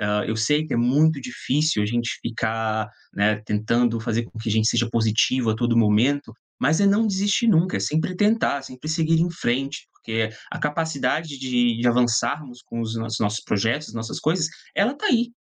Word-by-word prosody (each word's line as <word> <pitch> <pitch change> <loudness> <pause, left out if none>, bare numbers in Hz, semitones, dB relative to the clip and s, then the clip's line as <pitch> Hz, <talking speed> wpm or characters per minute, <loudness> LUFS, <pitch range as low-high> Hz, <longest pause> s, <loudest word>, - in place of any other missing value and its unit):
Hã, 105 0 0
eu 110 - -2
sei 150 +7 +2
que - - -6
é - - +1
muito 140 +5 +3
difícil 130 -1 0
a - - 0
gente 120 +1 -2
ficar, 110 -1 -2 0.3
né, 105 +1 +2
tentando 115 +3 +1
fazer 115 0 -1
com 115 - -12
que 110 0 -4
a - - 0
gente 110 +1 +3
seja 120 -1 +1
positivo 115 +2 +2
a 110 - -1
todo 120 -1 +1
momento, 115 +4 +2 0.3
mas 155 +8 +2
é 200 - +4
não 210 +3 +3
desistir 205 +3 +1
nunca, 180 -2 +3
é - - -2
sempre 160 +4 -1
tentar, 205 -9 +2
sempre 130 +3 -9
seguir 160 0 +2
em 175 +1 +1
frente, 135 -3 -2
porque 110 -1 -2 0.2
a - - -5
capacidade 150 -1 -1
de 120 -3 +1
de 120 - +3
avançarmos 125 +2 0
com 115 - -5
os 115 0 -3
nossos 115 -1 -3
os - - -3
nossos 105 0 0
projetos, 115 +6 -1
nossas 115 -1 -5
coisas, 160 +1 +1 0.3
ela 220 +7 +2
tá 425 - -2
aí. 240 -2 +2
125 Hz, 200 wpm, -23 LUFS, 115-155 Hz, 0.3 s, é